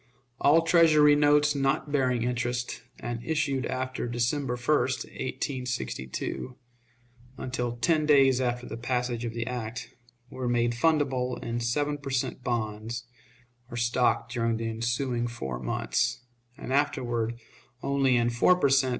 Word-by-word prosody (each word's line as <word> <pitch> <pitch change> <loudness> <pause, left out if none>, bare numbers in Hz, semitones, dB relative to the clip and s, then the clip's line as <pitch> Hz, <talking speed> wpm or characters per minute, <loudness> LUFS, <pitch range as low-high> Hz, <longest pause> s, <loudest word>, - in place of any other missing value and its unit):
All 165 +3 +5
Treasury 155 -3 +6
notes 145 0 +4
not 140 +1 0
bearing 125 -4 +1
interest, 120 0 -2 0.2
and 120 -1 -5
issued 140 -2 0
after 130 -1 -3
December 120 +2 -1
1, 120 0 -11
1862, 130 - -3 0.8
until 125 -2 -3
ten 155 +4 +2
days 135 -3 +5
after 125 -1 -1
the - - -6
passage 120 -1 -2
of 115 0 -4
the 115 0 -2
act, 115 -1 -5 0.4
were 130 -1 -3
made 120 0 +2
fundable 130 -3 +1
in 115 0 -2
seven 145 +5 -1
per 140 -1 -7
cent. 130 -1 -2
bonds 115 0 -3 0.6
or 120 - -6
stock 120 0 +1
during 115 -2 0
the 115 0 -3
ensuing 120 +2 -1
four 65 - -5
months, 65 - -1 0.3
and 130 - -5
afterward 120 -5 0 0.4
only 135 -2 +2
in 120 0 +2
four 120 +10 +4
per 160 -6 +2
cent. 135 -1 +4
125 Hz, 135 wpm, -28 LUFS, 120-140 Hz, 0.8 s, Treasury